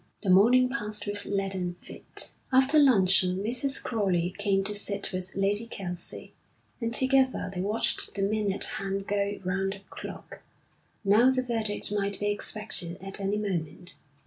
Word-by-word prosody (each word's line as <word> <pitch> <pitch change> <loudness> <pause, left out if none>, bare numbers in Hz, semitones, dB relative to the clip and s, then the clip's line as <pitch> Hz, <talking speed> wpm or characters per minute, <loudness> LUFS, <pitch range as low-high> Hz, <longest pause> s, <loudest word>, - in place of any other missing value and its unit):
The 195 - +2
morning 240 +7 +6
passed 210 -5 -3
with 205 0 -4
leaden 195 -3 -2
feet. - - -1 0.2
After 265 +4 +5
luncheon 190 -8 +5
Mrs. 255 +5 0
Crowley 185 -6 0
came 200 -2 +1
to 210 +2 -2
sit 200 -1 0
with 185 0 -4
Lady 205 +3 0
Kelsey, 180 -5 -5 0.5
and 230 0 -1
together 260 -5 +2
they 180 - -3
watched 210 +1 0
the 195 - -1
minute 205 -1 +1
hand 195 0 -3
go 200 0 -1
round 195 +1 -1
the 195 - -12
clock. - - -9 0.6
Now 215 +5 +5
the 260 -1 +1
verdict 220 -5 -2
might 200 -1 -1
be 205 0 0
expected 205 -4 -3
at 195 +2 -7
any 200 +1 -1
moment. 175 -4 -3
200 Hz, 150 wpm, -28 LUFS, 195-220 Hz, 0.6 s, morning